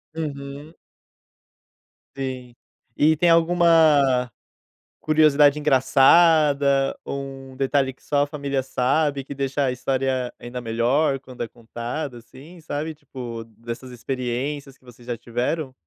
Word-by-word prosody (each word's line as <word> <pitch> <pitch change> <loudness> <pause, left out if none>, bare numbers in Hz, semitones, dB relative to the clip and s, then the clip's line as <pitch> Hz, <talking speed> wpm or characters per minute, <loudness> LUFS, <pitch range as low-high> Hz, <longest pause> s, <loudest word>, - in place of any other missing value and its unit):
Uhum. 145 0 -6 1.4
Sim. 130 -2 -5 0.4
E 155 +2 +4
tem 170 +3 +2
alguma 165 -6 +4 0.7
curiosidade 150 -1 +4
engraçada, 140 0 +4
ou 140 - -4 0.3
um - - -15
detalhe 135 0 +1
que 130 - -31
só 145 -1 +1
a - - -3
família 140 -2 -2
sabe, 135 +2 0
que 140 - -8
deixa 140 +1 -1
a 130 - +1
história 130 0 -1
ainda 125 +1 -7
melhor 125 +5 +1
quando 130 -2 -11
é 115 - -4
contada, 120 +4 -6
assim, 145 +9 -15
sabe, 155 +1 -4
tipo, 120 -6 -8
dessas 115 +2 -7
experiências 130 +3 -4
que - - -34
vocês 120 0 -16
já 120 -1 -3
tiveram? 125 +5 -3
135 Hz, 125 wpm, -23 LUFS, 125-150 Hz, 1.4 s, E